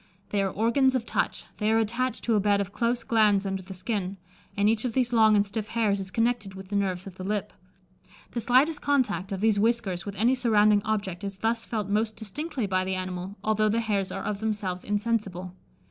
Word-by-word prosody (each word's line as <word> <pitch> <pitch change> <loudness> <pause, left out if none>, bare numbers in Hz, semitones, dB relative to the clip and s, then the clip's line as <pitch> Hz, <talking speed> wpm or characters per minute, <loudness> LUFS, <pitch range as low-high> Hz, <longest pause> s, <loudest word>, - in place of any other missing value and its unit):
They 205 - +1
are 195 - +1
organs 235 +7 +2
of 245 -3 -1
touch; - - -1
they 215 0 +2
are 225 - +4
attached 235 +4 -1
to 235 - +1
a 210 - +4
bed 205 0 +2
of 200 0 -3
close 235 +1 0
glands 210 -3 +3
under 195 -1 -2
the 190 +1 -10
skin; 195 -1 -3 0.4
and 200 +1 +3
each 220 0 +2
of 245 -3 -2
these 245 -1 +1
long 220 -2 +6
and 205 0 +4
stiff 210 +1 -4
hairs 220 -4 +1
is 190 -1 -5
connected 225 -2 0
with 190 0 -10
the 205 - -3
nerves 190 -2 0
of 190 -2 -10
the 185 - -6
lip. 205 +1 -2 0.8
The 235 - -2
slightest 265 +7 +3
contact 215 -10 0
of 195 -1 -3
these 215 -2 +3
whiskers 215 -5 +1
with 200 0 -6
any 235 +5 +3
surrounding 215 -4 +4
object 200 -5 -2
is 195 -1 -4
thus 225 +3 -1
felt 215 -4 -3
most 215 +2 0
distinctly 270 - -4
by 185 -1 +1
the 190 0 -2
animal, 185 +1 -4
although 215 0 +2
the 225 +2 +1
hairs 200 -4 -1
are - - -4
of 205 -1 -2
themselves 205 -4 -2
insensible. 205 -4 -2
210 Hz, 220 wpm, -27 LUFS, 195-230 Hz, 0.8 s, long